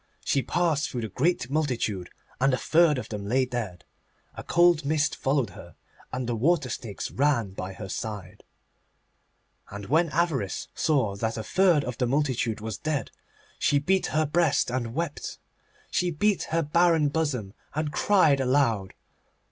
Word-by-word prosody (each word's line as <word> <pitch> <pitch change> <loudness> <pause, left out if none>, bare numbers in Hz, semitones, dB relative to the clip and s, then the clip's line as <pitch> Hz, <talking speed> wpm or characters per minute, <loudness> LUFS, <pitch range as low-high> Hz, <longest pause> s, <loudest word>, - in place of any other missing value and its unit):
She 135 - +2
passed 165 -1 0
through 125 - -4
the 110 - -4
great 140 - 0
multitude, 120 - -1 0.3
and 135 0 +3
a - - -4
third 160 -1 +3
of 125 - -5
them 105 -2 -5
lay 130 +6 +1
dead. 115 -9 -5 0.5
A - - -8
cold 175 -2 +4
mist 150 +1 +1
followed 135 -6 0
her, 85 -1 -12 0.4
and 125 0 -3
the 120 0 -1
water 145 +3 +2
snakes 110 -4 -5
ran 130 -8 +1
by 95 0 -6
her 95 0 -8
side. 100 -1 -6 1.3
And 100 0 -7
when 165 +4 +3
Avarice 150 - -1
saw 130 -11 +1
that 110 +2 -2
a 110 - -3
third 175 - +3
of 125 -2 -5
the 125 - +1
multitude 130 -5 0
was 110 -2 -5
dead 155 -3 -2 0.5
she 145 - +3
beat 185 +6 +1
her 155 0 +1
breast 150 -4 +2
and 120 -2 -3
wept. 165 -2 -3 0.5
She 180 - +1
beat 195 +5 +1
her 165 +1 +1
barren 165 0 +3
bosom, 140 -10 -2 0.2
and 155 -1 -1
cried 170 -9 +4
aloud. 125 -7 +1
135 Hz, 160 wpm, -26 LUFS, 115-155 Hz, 1.3 s, cold